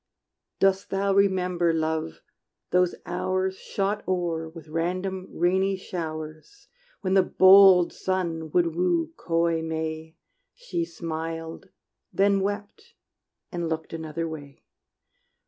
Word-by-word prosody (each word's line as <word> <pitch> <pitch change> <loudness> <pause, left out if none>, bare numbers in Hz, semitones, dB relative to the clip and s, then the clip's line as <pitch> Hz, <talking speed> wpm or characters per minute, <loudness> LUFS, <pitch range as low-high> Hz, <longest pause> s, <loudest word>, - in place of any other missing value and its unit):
Dost 195 0 +2
thou 195 0 +1
remember, 180 -3 +2
Love, 160 0 -2 0.5
those 180 0 +3
hours 185 +1 -1
Shot 200 +1 -2
o'er 170 -3 -1
with 160 -1 -12
random 185 +4 -2
rainy 190 +3 +1
showers, 155 - -7 0.3
When 190 -3 0
the 190 - +6
bold 190 -1 +7
sun 170 -4 -2
would 170 0 +1
woo 170 -2 +1
coy 165 -1 0
May? 160 0 -4 0.4
She 465 -9 -3
smiled, 165 - -6 0.4
then 200 0 +3
wept 205 - -5 0.6
and 170 -3 -3
looked 160 0 -4
another 160 0 -4
way. 145 -3 -9
175 Hz, 110 wpm, -26 LUFS, 160-190 Hz, 0.6 s, bold